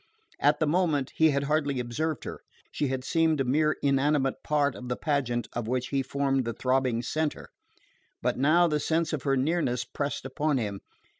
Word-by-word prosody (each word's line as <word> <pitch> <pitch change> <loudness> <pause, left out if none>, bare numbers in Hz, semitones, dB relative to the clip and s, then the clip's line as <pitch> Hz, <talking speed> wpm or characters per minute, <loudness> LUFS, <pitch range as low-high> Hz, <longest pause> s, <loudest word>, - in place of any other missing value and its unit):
At 145 +1 +3
the 155 - +2
moment 155 -4 +1
he 160 0 +5
had 140 -1 0
hardly 145 -2 0
observed 145 +6 -2
her: - - -7 0.3
she 145 - -1
had 130 -1 -2
seemed 160 0 +2
a - - +3
mere 150 +4 +2
inanimate 140 0 +2
part 145 -2 +1
of 125 -1 -8
the 125 - 0
pageant 125 -7 -1
of 120 -2 -3
which 125 +1 -1
he 135 -1 +1
formed 135 0 0
the 115 0 -3
throbbing 125 -1 0
centre. 155 +4 -2 0.7
But - - 0
now 155 +6 +4
the 150 -2 0
sense 160 +2 0
of 150 - -1
her 135 0 +1
nearness 130 -4 0
pressed 140 +2 -4
upon 145 +2 0
him. 100 -5 -3
140 Hz, 190 wpm, -28 LUFS, 130-155 Hz, 0.7 s, he